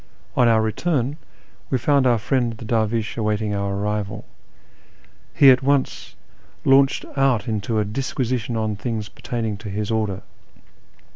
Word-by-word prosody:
On 125 Hz, -, +4 dB
our 110 Hz, -1 st, +4 dB
return 135 Hz, +4 st, -1 dB, 0.5 s
we 130 Hz, -, +1 dB
found 140 Hz, +1 st, +3 dB
our 120 Hz, -2 st, +4 dB
friend 120 Hz, +2 st, 0 dB
the 115 Hz, +1 st, -10 dB
dervish 110 Hz, 0 st, -1 dB
awaiting 105 Hz, -1 st, -1 dB
our 100 Hz, -1 st, -2 dB
arrival. 100 Hz, -1 st, -3 dB, 1.1 s
He 135 Hz, -2 st, +7 dB
at 125 Hz, -, +4 dB
once 140 Hz, 0 st, 0 dB, 0.5 s
launched 135 Hz, 0 st, +4 dB
out 135 Hz, -6 st, +2 dB
into 110 Hz, 0 st, -1 dB
a 105 Hz, -, +1 dB
disquisition 120 Hz, 0 st, -2 dB
on 110 Hz, -1 st, -1 dB
things 105 Hz, 0 st, -4 dB
pertaining 120 Hz, -6 st, -4 dB
to 105 Hz, 0 st, -8 dB
his 105 Hz, +2 st, -3 dB
order. 105 Hz, -4 st, -1 dB
115 Hz, 140 wpm, -22 LUFS, 105-130 Hz, 1.1 s, He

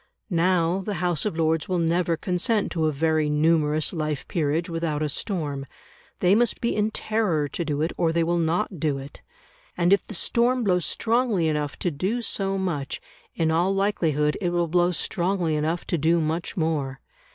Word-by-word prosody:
Now 175 Hz, +1 st, +2 dB
the 205 Hz, +1 st, -3 dB
House 175 Hz, -3 st, 0 dB
of 165 Hz, -, -4 dB
Lords 160 Hz, 0 st, +1 dB
will 185 Hz, -, +1 dB
never 170 Hz, 0 st, +1 dB
consent 190 Hz, +5 st, 0 dB
to 160 Hz, -3 st, +1 dB
a -, -, +1 dB
very 155 Hz, +1 st, +1 dB
numerous 155 Hz, 0 st, +2 dB
life 155 Hz, -3 st, -3 dB
peerage 160 Hz, +1 st, 0 dB
without 165 Hz, -3 st, -2 dB
a 150 Hz, -, 0 dB
storm; 145 Hz, -5 st, -3 dB, 0.5 s
they 180 Hz, +1 st, +5 dB
must 235 Hz, +2 st, +2 dB
be 235 Hz, -, 0 dB
in 210 Hz, +1 st, +1 dB
terror 210 Hz, -9 st, 0 dB
to 170 Hz, -, -3 dB
do 150 Hz, -1 st, -1 dB
it, 165 Hz, -, -1 dB
or 165 Hz, -2 st, +2 dB
they 165 Hz, 0 st, +1 dB
will 170 Hz, +1 st, +1 dB
not 170 Hz, +3 st, 0 dB
do 145 Hz, -2 st, 0 dB
it. 135 Hz, +2 st, -10 dB, 0.6 s
And 175 Hz, +2 st, +4 dB
if 200 Hz, -, +3 dB
the 215 Hz, -, -6 dB
storm 240 Hz, +8 st, +1 dB
blows 180 Hz, -4 st, +2 dB
strongly 230 Hz, -7 st, +1 dB
enough 150 Hz, -2 st, -1 dB
to 175 Hz, -, -1 dB
do 195 Hz, +11 st, -2 dB
so 195 Hz, -3 st, -1 dB
much, 170 Hz, -8 st, -2 dB, 0.4 s
in 160 Hz, -1 st, +1 dB
all 175 Hz, +4 st, +2 dB
likelihood 160 Hz, -7 st, +1 dB
it 180 Hz, -, +1 dB
will 175 Hz, -1 st, 0 dB
blow 175 Hz, +2 st, +2 dB
strongly 175 Hz, -1 st, 0 dB
enough 160 Hz, +3 st, -1 dB
to 170 Hz, -, -1 dB
do 165 Hz, +3 st, +3 dB
much 160 Hz, +4 st, -2 dB
more. 150 Hz, -5 st, -1 dB
170 Hz, 185 wpm, -25 LUFS, 155-185 Hz, 0.6 s, they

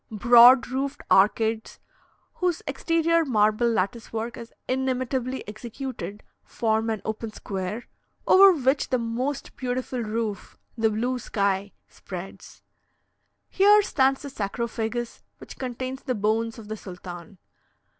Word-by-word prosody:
Broad 240 Hz, +4 st, +7 dB
roofed 270 Hz, +2 st, -3 dB
arcades, 220 Hz, +3 st, +2 dB, 0.6 s
whose 360 Hz, -2 st, -1 dB
exterior 330 Hz, 0 st, +1 dB
marble 215 Hz, -3 st, +2 dB
lattice 225 Hz, +1 st, -2 dB
work 225 Hz, +1 st, -4 dB
is 235 Hz, -1 st, -10 dB, 0.2 s
inimitably 260 Hz, -1 st, -2 dB
executed, 230 Hz, 0 st, -7 dB, 0.2 s
form 220 Hz, 0 st, -1 dB
an 220 Hz, -2 st, -3 dB
open 220 Hz, 0 st, -4 dB
square, 200 Hz, +2 st, -5 dB, 0.4 s
over 390 Hz, +1 st, +8 dB
which 275 Hz, -4 st, +1 dB
the 255 Hz, -, +2 dB
most 245 Hz, +4 st, -3 dB
beautiful 250 Hz, 0 st, -3 dB
roof 220 Hz, -2 st, -4 dB, 0.2 s
the 225 Hz, -2 st, +2 dB
blue 245 Hz, +4 st, -1 dB
sky 200 Hz, -2 st, -1 dB, 0.2 s
spreads. 185 Hz, 0 st, -10 dB, 0.8 s
Here 410 Hz, +2 st, +5 dB
stands 270 Hz, -5 st, +1 dB
the 280 Hz, -, -7 dB
sarcophagus 235 Hz, +1 st, -3 dB, 0.2 s
which -, -, -12 dB
contains 255 Hz, +1 st, -5 dB
the 255 Hz, -3 st, -2 dB
bones 225 Hz, +2 st, 0 dB
of 220 Hz, -2 st, -11 dB
the 215 Hz, +1 st, -5 dB
sultan. 180 Hz, -1 st, -10 dB
235 Hz, 120 wpm, -25 LUFS, 215-260 Hz, 0.8 s, over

